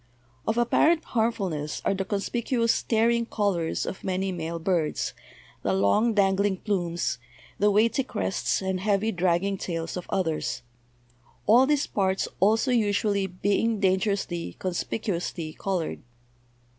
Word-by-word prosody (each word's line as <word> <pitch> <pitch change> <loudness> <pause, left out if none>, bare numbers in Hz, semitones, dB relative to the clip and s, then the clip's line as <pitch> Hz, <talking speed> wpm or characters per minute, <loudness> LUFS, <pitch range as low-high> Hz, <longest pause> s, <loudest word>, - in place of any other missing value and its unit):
Of 220 - +1
apparent 310 +7 +3
harmfulness 195 - -1
are - - +3
the 195 0 -2
conspicuous 230 +3 0
staring 235 +1 +1
colors 195 -8 0
of - - -6
many 190 +1 -1
male 170 -1 -4
birds, 165 -2 -1 0.5
the 95 - 0
long 100 - +3
dangling 195 -1 +2
plumes, 175 - -1 0.4
the 210 - +4
weighty 220 +6 +3
crests 210 -5 -1
and 190 -1 -1
heavy, 205 +2 +1
dragging 185 +1 +1
tails 165 -2 -3
of 180 - -6
others; 165 -8 -1 0.8
all 245 +5 +6
these 295 -1 +2
parts 190 -1 0
also 220 +7 +3
usually 205 -3 +1
being 205 +4 0
dangerously, 190 -3 0
conspicuously 175 -3 -3
colored. 185 -3 -2
195 Hz, 120 wpm, -26 LUFS, 175-220 Hz, 0.8 s, all